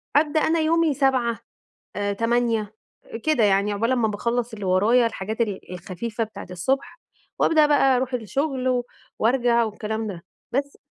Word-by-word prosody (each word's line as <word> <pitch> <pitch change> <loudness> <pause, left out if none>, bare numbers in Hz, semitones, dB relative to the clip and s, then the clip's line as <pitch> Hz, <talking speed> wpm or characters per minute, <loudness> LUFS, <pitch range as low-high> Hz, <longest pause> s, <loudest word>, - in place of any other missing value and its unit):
أبدأ 300 +1 +3
أنا 325 +1 +2
يومي 320 0 +2
07:00 260 -4 +1 0.6
آآ، 205 0 -1
08:00 230 -1 0 0.5
كده 310 -7 +2
يعني 200 0 +3
عقبال 230 +4 0
امّا 240 -3 +2
باخلّص 235 +3 -2
اللي 205 -2 -6
ورايا 210 +7 +4
الحاجات 220 0 -3
ال 205 -5 -3
الخفيفة 210 +5 -4
بتاعة 220 - -9
الصبح، 265 - -2 0.4
وأبدأ 310 -2 +5
بقى 275 -3 +4
أروح 255 +1 -2
الشغل 255 +1 -1 0.4
وأرجع 235 0 +3
والكلام 220 0 -3
ده 185 -4 -7 0.3
بس. 280 +2 -2
235 Hz, 145 wpm, -23 LUFS, 210-270 Hz, 0.6 s, وأبدأ